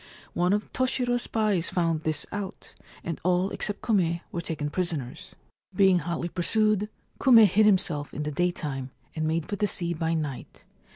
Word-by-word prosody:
One 175 +1 +1
of 210 +1 -1
Toshiro's 250 -1 0
spies 210 -7 0
found 165 -3 0
this 155 -1 -1
out, 205 -2 -6 0.3
and 165 -2 -4
all 180 +2 +2
except 205 -1 -3
Kume 175 -6 +1
were 170 - -3
taken 155 -3 -4
prisoners. 160 -9 -3 0.4
Being 190 -2 +5
hotly 170 +1 -3
pursued, 210 +3 +1 0.3
Kume 235 -5 +8
hid 210 +3 +4
himself 165 -7 +1
in 150 - -4
the 150 - -3
daytime, 150 -5 -2 0.3
and 155 -1 -1
made 160 0 0
for 205 - -3
the 210 - +1
sea 170 -3 -1
by 165 0 -1
night. 145 -5 -5
175 Hz, 165 wpm, -27 LUFS, 160-205 Hz, 0.4 s, Kume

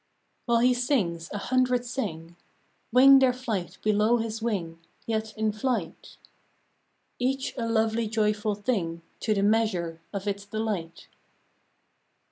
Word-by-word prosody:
" - - -46
While 235 -1 +3
he 250 +1 +5
sings, 210 - 0
a - - -3
hundred 250 +2 +1
sing; 170 -10 -5 0.6
Wing 270 +3 +8
their 260 -1 +4
flight 225 -9 -4
below 215 +2 +3
his 225 -1 -3
wing 180 -8 -2 0.3
Yet 220 -1 -3
in 215 0 +1
flight; 215 -6 -3 1.0
Each 265 +2 -1
a 230 -2 -2
lovely 225 0 +1
joyful 210 -1 0
thing 185 -7 -2 0.2
To 215 -2 0
the 200 - +1
measure 195 -7 +1
of 200 0 -5
its 200 0 -2
delight. 205 -5 -4
220 Hz, 130 wpm, -27 LUFS, 200-240 Hz, 1.0 s, Wing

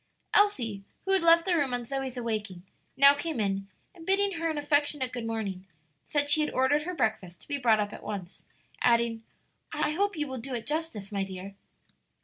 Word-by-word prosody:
Elsie, 245 - +3 0.2
who 385 - 0
had 385 -1 +3
left 335 0 +5
the 365 -2 +2
room 275 -6 +1
on 245 - -4
Zoe's 265 +1 -4
awaking, 215 -6 -3 0.3
now 280 +1 +8
came 295 -2 -4
in 195 -1 -1 0.3
and 340 -3 -13
bidding 390 0 +1
her 330 0 0
an 315 - -2
affectionate 290 -3 +1
good 240 -2 -5
morning, 200 -4 -4 0.4
said 290 -1 +1
she 295 +2 +6
had 300 - 0
ordered 265 +3 +2
her 360 0 -4
breakfast 215 - -2
to - - -12
be 285 -1 -2
brought 225 -4 +4
up 205 -1 -2
at - - -9
once, 195 -3 -7 0.4
adding, 235 -1 +2 0.5
"I - - 0
hope 400 +3 0
you 300 - 0
will 260 -1 -5
do 255 +2 -5
it 230 - -5
justice, 295 -10 -3
my 200 -1 -1
dear." 190 +1 -7
260 Hz, 200 wpm, -28 LUFS, 215-310 Hz, 0.5 s, now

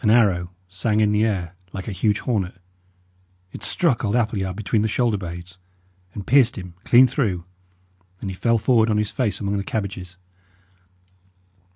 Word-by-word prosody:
An 105 - +3
arrow 100 -7 +3 0.2
sang 100 +4 0
in 105 -1 +3
the 105 +1 +2
air, 95 -6 -1 0.2
like 95 -1 -6
a - - -3
huge 100 +2 0
hornet; 95 -7 -2 0.9
it - - -9
struck 150 -10 +1
old 105 0 0
Appleyard 105 -6 0
between 105 +1 0
the 110 - +1
shoulder 115 0 +1
blades, 90 -1 -7 0.6
and 100 - -6
pierced 130 -1 +4
him 90 -2 -8
clean 125 +2 +7
through, 110 - -1 0.7
and - - -6
he - - -7
fell 115 +4 +2
forward 115 -1 +3
on 105 - +2
his 105 -1 0
face 120 -6 -1
among 100 0 -1
the 100 - -2
cabbages. 95 -4 -4
105 Hz, 170 wpm, -23 LUFS, 95-115 Hz, 0.9 s, clean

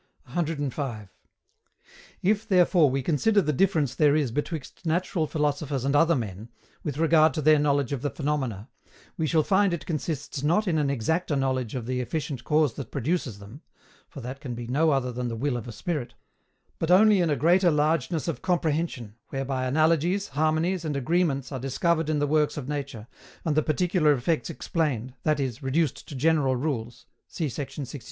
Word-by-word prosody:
105. 140 - -3 1.1
If 210 +3 +1
therefore 180 -5 +4
we 135 0 -1
consider 205 - +2
the 155 -6 +1
difference 155 - +2
there 150 -1 +3
is 145 -6 +1
betwixt 150 +2 -5
natural 170 -1 0
philosophers 145 -3 -1
and 140 +1 +1
other 165 +3 +4
men, 110 -2 -5 0.3
with 145 -2 -4
regard 160 -1 +4
to 155 - -1
their 155 0 +6
knowledge 145 -3 +1
of 135 - -3
the 145 - -1
phenomena, 130 -8 -3 0.5
we 160 - -1
shall 155 0 +3
find 190 0 +3
it 170 - -9
consists 155 -3 -3
not 175 +9 +2
in 160 -3 +2
an 145 -2 +1
exacter 145 +5 0
knowledge 130 -3 -1
of 125 -3 -4
the 125 +1 -2
efficient 140 -1 -4
cause 150 -4 +2
that 130 -2 -7
produces 140 - -2
them 105 +9 -12 0.5
for 140 - -9
that 130 +3 -6
can 125 -5 -5
be 120 0 -6
no 145 +7 +2
other 135 -4 +1
than 125 0 -3
the 115 - -3
will 130 +3 -1
of 120 0 -5
a - - -6
spirit 140 +3 -4 0.6
but 165 - -1
only 200 +1 +6
in 170 - +1
a 145 - +2
greater 175 +7 +4
largeness 155 +1 +1
of 165 - -3
comprehension, 160 - -1 0.2
whereby 135 -1 -2
analogies, 165 +7 +2
harmonies, 160 +4 0
and 150 -3 -2
agreements 140 -2 0
are 135 - -4
discovered 155 +5 0
in 155 - +1
the 145 - +1
works 150 +1 +1
of 135 -3 -5
nature, 140 -6 -5 0.4
and 155 -3 +1
the 155 - +4
particular 165 -1 +2
effects 135 -1 -1
explained, 130 -5 -2
that 155 +2 +1
is, 130 -1 -3
reduced 135 -5 -1
to 145 - -8
general 140 -1 +2
rules, 125 -4 -3 0.2
see 160 - -3
sect. 135 +1 -6
150 Hz, 180 wpm, -26 LUFS, 130-165 Hz, 1.1 s, their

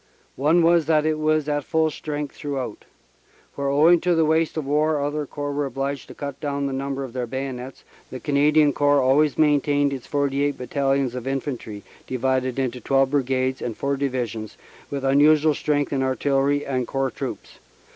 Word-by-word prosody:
One 160 +5 +3
was 170 -1 +4
that 155 -2 +3
it 155 -1 0
was 155 -1 +1
at 145 -1 -1
full 160 +3 +1
strength 150 -1 -5
through 145 -2 -4
out. 125 -5 -5 0.7
Where 140 0 -3
owing 160 +5 +5
to 180 -1 +2
the 165 -1 +3
waste 160 +1 +1
of 155 - -2
war 150 +2 +1
other 145 +1 -2
Corps 145 +1 -4
were 145 0 -1
obliged 135 +1 -4
to - - -11
cut 140 -2 -6
down 140 -1 -2
the 135 - -2
number 135 0 -3
of 130 -3 -8
their 125 -2 -3
bayonets, 130 0 -6 0.3
the 130 - -7
Cana 145 +1 +2
dian 150 -2 +4
Corps 145 0 +3
always 140 +3 +3
maintained 145 -1 +2
its 130 -3 -7
forty 140 -1 0
eight 145 0 0
Battalions 135 0 0
of 125 0 -6
Infantry, 130 -6 -4 0.2
divided 130 0 -1
into 125 -2 -2
twelve 135 +2 +2
Brigades 130 -2 0
and 115 -3 -4
four 140 0 -1
Divisions, 125 -6 -3 0.3
with 140 -1 -4
unusual 150 +3 +4
strength 145 -1 -1
in 135 - 0
Artillery 135 +2 +1
and 130 -3 -2
Corps 135 -1 -1
Troops. - - -7
140 Hz, 185 wpm, -23 LUFS, 130-150 Hz, 0.7 s, owing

